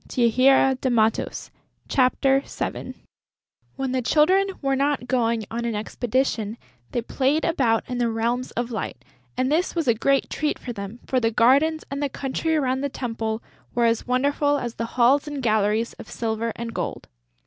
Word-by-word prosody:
CHAPTER 235 Hz, -2 st, +3 dB
VII 265 Hz, +2 st, +4 dB
THE 225 Hz, -4 st, +2 dB, 0.6 s
GRAVEYARD 270 Hz, +1 st, +1 dB, 0.8 s
When 270 Hz, -1 st, -2 dB
the 260 Hz, 0 st, 0 dB
Children 350 Hz, +10 st, +4 dB
were 275 Hz, -1 st, 0 dB
not 280 Hz, -1 st, 0 dB
going 230 Hz, -4 st, +1 dB
on 235 Hz, +1 st, -3 dB
an 235 Hz, -2 st, -2 dB
expedition, 225 Hz, 0 st, -1 dB, 0.3 s
they 240 Hz, -, -1 dB
played 275 Hz, +6 st, +1 dB
about 250 Hz, -9 st, +1 dB
in 250 Hz, -1 st, -3 dB
the 240 Hz, -1 st, +2 dB
Realms 235 Hz, +3 st, -1 dB
of 240 Hz, 0 st, -1 dB
Light; 220 Hz, -, -5 dB, 0.3 s
and 255 Hz, +2 st, +1 dB
this 345 Hz, +5 st, +1 dB
was 330 Hz, -5 st, -1 dB
a 235 Hz, -, +5 dB
great 275 Hz, +5 st, +1 dB
treat 300 Hz, -1 st, -1 dB
for 245 Hz, -, -6 dB
them, 200 Hz, +2 st, -7 dB
for 260 Hz, -, +1 dB
the 225 Hz, -2 st, +2 dB
gardens 280 Hz, +8 st, +3 dB
and 280 Hz, +1 st, -3 dB
the 285 Hz, -, 0 dB
country 280 Hz, +5 st, -2 dB
around 265 Hz, -3 st, 0 dB
the 285 Hz, -, -1 dB
temple 225 Hz, -3 st, -3 dB, 0.3 s
were 240 Hz, -1 st, +3 dB
as 230 Hz, +1 st, +1 dB
wonderful 285 Hz, +3 st, +2 dB
as 240 Hz, -4 st, -4 dB
the 230 Hz, -, -3 dB
halls 265 Hz, +5 st, +4 dB
and 290 Hz, -3 st, -5 dB
galleries 215 Hz, 0 st, +1 dB
of -, -, -10 dB
silver 225 Hz, 0 st, -2 dB
and 230 Hz, 0 st, -5 dB
gold. -, -, -4 dB
250 Hz, 170 wpm, -24 LUFS, 230-275 Hz, 0.8 s, a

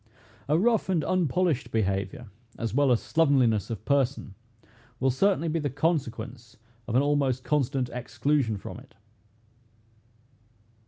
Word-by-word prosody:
A 150 Hz, -, +4 dB
rough 225 Hz, +2 st, +2 dB
and 170 Hz, -5 st, +1 dB
unpolished 175 Hz, -4 st, 0 dB
behavior, 100 Hz, +1 st, -2 dB, 0.3 s
as 115 Hz, -2 st, -3 dB
well 140 Hz, 0 st, +3 dB
as 120 Hz, -, +3 dB
slovenliness 130 Hz, -, +2 dB
of 110 Hz, -2 st, -6 dB
person, 135 Hz, -6 st, 0 dB, 0.7 s
will 135 Hz, 0 st, +2 dB
certainly 175 Hz, +5 st, +1 dB
be 165 Hz, +1 st, 0 dB
the 145 Hz, -2 st, -1 dB
consequence 125 Hz, -6 st, -3 dB, 0.3 s
of 120 Hz, -, -2 dB
an 130 Hz, -, +4 dB
almost 140 Hz, -3 st, +1 dB
constant 135 Hz, -3 st, 0 dB
exclusion 125 Hz, -1 st, -1 dB
from -, -, -8 dB
it. -, -, -19 dB
135 Hz, 125 wpm, -27 LUFS, 120-150 Hz, 0.7 s, A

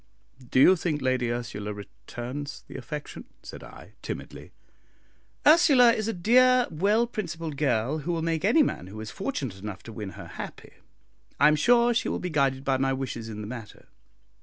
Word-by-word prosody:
"Do -, -, +2 dB
you 185 Hz, +8 st, +7 dB
think 160 Hz, -3 st, -2 dB
Lady 130 Hz, -3 st, 0 dB
Ursula 105 Hz, -3 st, -4 dB
returns 125 Hz, +7 st, -7 dB
the -, -, -11 dB
affection?" 150 Hz, -2 st, -7 dB, 0.2 s
said -, -, -10 dB
I, -, -, -13 dB
timidly. -, -, -7 dB, 0.9 s
"Ursula 290 Hz, -7 st, +7 dB
is 215 Hz, -1 st, -2 dB
a -, -, +1 dB
dear, 250 Hz, +7 st, +4 dB
well 205 Hz, +8 st, +2 dB
principled 165 Hz, -9 st, -5 dB
girl, 135 Hz, 0 st, 0 dB
who 155 Hz, +4 st, -3 dB
will 165 Hz, -1 st, -2 dB
make 165 Hz, -1 st, -1 dB
any 245 Hz, +10 st, +5 dB
man 90 Hz, -, -3 dB
who 105 Hz, +3 st, -9 dB
is 110 Hz, -1 st, -6 dB
fortunate 140 Hz, -, -4 dB
enough 105 Hz, 0 st, -7 dB
to 115 Hz, -, -10 dB
win 105 Hz, -3 st, -6 dB
her -, -, -8 dB
happy. -, -, -9 dB, 0.7 s
I 150 Hz, +2 st, +7 dB
am 155 Hz, -, +3 dB
sure 240 Hz, +8 st, +4 dB
she 235 Hz, -, 0 dB
will -, -, -1 dB
be 180 Hz, -, -4 dB
guided 135 Hz, -3 st, +1 dB
by 135 Hz, -1 st, +2 dB
my 135 Hz, 0 st, +1 dB
wishes 130 Hz, -4 st, -5 dB
in 105 Hz, -1 st, -6 dB
the 105 Hz, -, -6 dB
matter. 115 Hz, -2 st, -10 dB
145 Hz, 185 wpm, -26 LUFS, -, 0.9 s, you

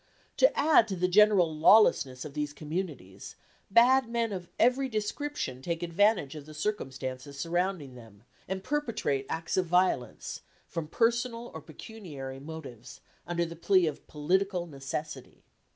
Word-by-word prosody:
To -, -, +4 dB
add 300 Hz, -7 st, +5 dB
to 195 Hz, -, -3 dB
the 180 Hz, 0 st, +1 dB
general 190 Hz, -4 st, +5 dB
lawlessness 155 Hz, -7 st, +4 dB
of 145 Hz, -, -8 dB
these 150 Hz, 0 st, -3 dB
communities, 150 Hz, -, -6 dB, 0.3 s
bad 245 Hz, +4 st, +5 dB
men 235 Hz, -1 st, -1 dB
of 180 Hz, -2 st, -6 dB
every 255 Hz, +3 st, +3 dB
description 215 Hz, -, -3 dB
take 170 Hz, +3 st, -3 dB
advantage 175 Hz, -3 st, +2 dB
of 150 Hz, -1 st, -9 dB
the 155 Hz, -, -11 dB
circumstances 135 Hz, -6 st, -4 dB
surrounding 170 Hz, -3 st, -1 dB
them, 115 Hz, -4 st, -15 dB, 0.2 s
and 190 Hz, 0 st, -4 dB
perpetrate 230 Hz, -, -1 dB
acts 165 Hz, +2 st, -3 dB
of 185 Hz, -2 st, +1 dB
violence, 180 Hz, -9 st, 0 dB, 0.2 s
from 165 Hz, -2 st, -5 dB
personal 235 Hz, +4 st, 0 dB
or -, -, -7 dB
pecuniary 145 Hz, -, -9 dB
motives, 135 Hz, -5 st, -10 dB, 0.3 s
under 170 Hz, 0 st, 0 dB
the 170 Hz, 0 st, -8 dB
plea 185 Hz, +2 st, +3 dB
of 155 Hz, -, -4 dB
political 180 Hz, +4 st, 0 dB
necessity." 140 Hz, -1 st, -7 dB
170 Hz, 140 wpm, -29 LUFS, 140-210 Hz, 0.3 s, add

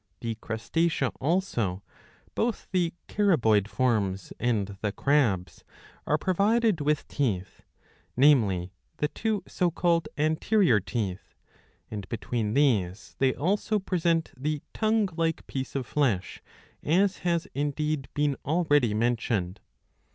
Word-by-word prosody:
The 115 Hz, -1 st, -2 dB
Crustacea 125 Hz, +7 st, -1 dB
also, 130 Hz, -, 0 dB, 0.5 s
both 230 Hz, -1 st, -1 dB
the 175 Hz, -3 st, +1 dB, 0.2 s
Caraboid 120 Hz, -, +3 dB
forms 105 Hz, -6 st, 0 dB
and 105 Hz, -5 st, 0 dB
the 105 Hz, -, 0 dB
Crabs,''^ 115 Hz, -10 st, +1 dB, 0.5 s
are 150 Hz, -, +3 dB
provided 200 Hz, +1 st, +2 dB
with 150 Hz, 0 st, 0 dB
teeth, 105 Hz, -10 st, -2 dB, 0.6 s
namely 105 Hz, -10 st, +4 dB, 0.2 s
the 150 Hz, -, 0 dB
two 215 Hz, -1 st, -2 dB
so 180 Hz, -2 st, +1 dB
called 170 Hz, 0 st, +1 dB
anterior 155 Hz, -, +3 dB
teeth; 100 Hz, -2 st, -4 dB, 0.6 s
and 105 Hz, -3 st, -6 dB
between 115 Hz, -2 st, -2 dB
these 110 Hz, -10 st, +1 dB
they 130 Hz, -1 st, +3 dB
also 205 Hz, +7 st, 0 dB
present 170 Hz, -4 st, 0 dB
the 150 Hz, +2 st, -3 dB
tongue 220 Hz, -1 st, +2 dB
like 165 Hz, -1 st, 0 dB
piece 130 Hz, 0 st, -5 dB
of 135 Hz, -2 st, -1 dB
flesh, 120 Hz, -11 st, -1 dB, 0.4 s
as 190 Hz, +5 st, +2 dB
has 170 Hz, -2 st, 0 dB
indeed 145 Hz, 0 st, -1 dB
been 145 Hz, -1 st, +1 dB
already 145 Hz, -8 st, +2 dB
mentioned. 115 Hz, -5 st, 0 dB
140 Hz, 115 wpm, -27 LUFS, 110-170 Hz, 0.6 s, namely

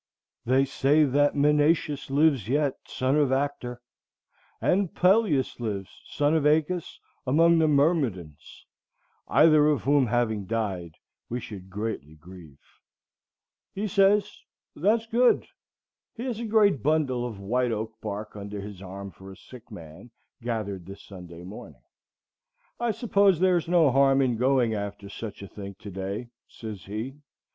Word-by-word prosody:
They 130 Hz, +3 st, +3 dB
say 140 Hz, +3 st, +3 dB
that 145 Hz, +1 st, +2 dB
Menœtius 150 Hz, 0 st, +2 dB
lives 140 Hz, -5 st, +2 dB
yet, 145 Hz, 0 st, +1 dB
son 130 Hz, +2 st, 0 dB
of 145 Hz, -3 st, +2 dB
Actor, 130 Hz, -3 st, -2 dB, 0.8 s
And 190 Hz, -1 st, +1 dB
Peleus 180 Hz, -, +2 dB
lives, 100 Hz, -5 st, -4 dB, 0.2 s
son 145 Hz, +1 st, 0 dB
of 160 Hz, -, +1 dB
Æacus, 155 Hz, +3 st, +1 dB, 0.3 s
among 165 Hz, +5 st, +4 dB
the 160 Hz, -, +3 dB
Myrmidons, 140 Hz, -, -1 dB, 0.6 s
Either 155 Hz, -2 st, +5 dB
of 150 Hz, -6 st, +1 dB
whom 140 Hz, -1 st, +3 dB
having 110 Hz, -4 st, -1 dB
died, 95 Hz, -8 st, -3 dB, 0.3 s
we 120 Hz, -, -3 dB
should 95 Hz, -5 st, -9 dB
greatly 100 Hz, -7 st, -5 dB
grieve." 80 Hz, -3 st, -14 dB, 1.2 s
He 210 Hz, +2 st, -2 dB
says, 200 Hz, +1 st, +2 dB, 0.3 s
"That's 220 Hz, +7 st, +1 dB
good." 240 Hz, +2 st, +3 dB, 0.7 s
He 235 Hz, -, -6 dB
has 245 Hz, -4 st, -3 dB
a 235 Hz, -, -4 dB
great 205 Hz, -, +3 dB
bundle 140 Hz, -4 st, +1 dB
of 115 Hz, -5 st, -6 dB
white 120 Hz, +5 st, 0 dB
oak 110 Hz, 0 st, -3 dB
bark 105 Hz, +2 st, -6 dB
under 100 Hz, 0 st, -6 dB
his 100 Hz, -1 st, -9 dB
arm 100 Hz, +1 st, -8 dB
for 95 Hz, +3 st, -13 dB
a 95 Hz, -, -13 dB
sick 125 Hz, -2 st, -14 dB
man, 85 Hz, +2 st, -11 dB, 0.3 s
gathered 105 Hz, -6 st, -4 dB
this 100 Hz, +1 st, -10 dB
Sunday 90 Hz, -3 st, -11 dB
morning. 95 Hz, +4 st, -11 dB, 1.0 s
"I 240 Hz, 0 st, 0 dB
suppose 200 Hz, -5 st, +2 dB
there's 180 Hz, -3 st, +2 dB
no 170 Hz, -5 st, +4 dB
harm 135 Hz, +1 st, +4 dB
in 125 Hz, -2 st, +1 dB
going 125 Hz, -1 st, +2 dB
after 100 Hz, -1 st, -5 dB
such 105 Hz, 0 st, -8 dB
a -, -, -8 dB
thing 100 Hz, 0 st, -9 dB
to 100 Hz, -, -10 dB
day," 100 Hz, +6 st, -5 dB, 0.2 s
says 110 Hz, -4 st, -9 dB
he. 110 Hz, +7 st, -5 dB
125 Hz, 145 wpm, -26 LUFS, 100-155 Hz, 1.2 s, Either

